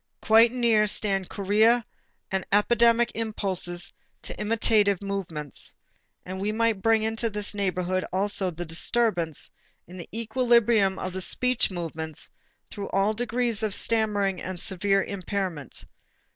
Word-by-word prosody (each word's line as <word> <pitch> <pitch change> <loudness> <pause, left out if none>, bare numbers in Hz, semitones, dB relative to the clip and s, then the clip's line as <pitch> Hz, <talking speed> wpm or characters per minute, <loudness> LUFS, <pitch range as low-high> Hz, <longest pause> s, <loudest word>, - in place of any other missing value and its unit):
Quite 225 +1 +6
near 230 -4 +3
stand 195 -3 0
chorea 215 +4 +3 0.5
and 190 0 0
the - - +3
epidemic 235 +2 +3
impulses 190 -6 -3 0.3
to - - -5
imitative 210 -2 +2
movements. 180 -8 -4 0.5
And 190 +1 -6
we 205 +2 0
might 225 -2 +1
bring 225 0 +3
into 225 +1 -1
this 210 0 -4
neighborhood 185 -2 -1
also 195 0 0
the 175 0 -6
disturbance 170 -1 0 0.3
in 180 +2 -12
the 175 - -9
equilibrium 230 -3 +2
of 185 - -5
the 190 - -3
speech 250 +6 +3
movements 160 -4 -5 0.4
through 200 -1 -6
all 195 +2 +1
degrees 235 -1 0
of 215 -2 +2
stammering 205 -4 +1
and 185 -1 -5
severe 195 +2 +1
impairment. 185 - -4
205 Hz, 130 wpm, -26 LUFS, 185-225 Hz, 0.5 s, Quite